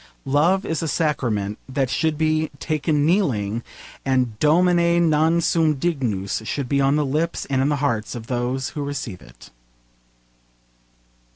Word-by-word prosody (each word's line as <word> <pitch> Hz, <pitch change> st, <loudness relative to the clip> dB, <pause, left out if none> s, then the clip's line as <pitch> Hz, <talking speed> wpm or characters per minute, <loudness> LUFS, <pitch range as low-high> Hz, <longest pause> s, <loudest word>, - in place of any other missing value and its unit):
Love 165 Hz, +8 st, +2 dB
is 160 Hz, -, -2 dB
a 165 Hz, -, -2 dB
sacrament 120 Hz, -9 st, -1 dB
that 135 Hz, 0 st, 0 dB
should 155 Hz, +4 st, 0 dB
be 155 Hz, 0 st, +1 dB
taken 150 Hz, 0 st, 0 dB
kneeling, 120 Hz, -, +1 dB, 0.4 s
and 125 Hz, -5 st, 0 dB
Domine, 170 Hz, +2 st, +3 dB
non 160 Hz, +3 st, +3 dB
sum 160 Hz, -2 st, +2 dB
dignus 125 Hz, -, -2 dB
should 135 Hz, +4 st, -3 dB
be 140 Hz, +2 st, +1 dB
on 135 Hz, +1 st, +3 dB
the 150 Hz, -1 st, +1 dB
lips 155 Hz, +5 st, -1 dB
and 135 Hz, -1 st, +2 dB
in 140 Hz, -, +2 dB
the 150 Hz, -, +1 dB
hearts 125 Hz, -7 st, -1 dB
of 115 Hz, -2 st, -7 dB
those 125 Hz, +2 st, -2 dB
who 145 Hz, -, -5 dB
receive 135 Hz, -9 st, -5 dB
it. -, -, -16 dB
145 Hz, 150 wpm, -22 LUFS, 125-160 Hz, 0.4 s, Domine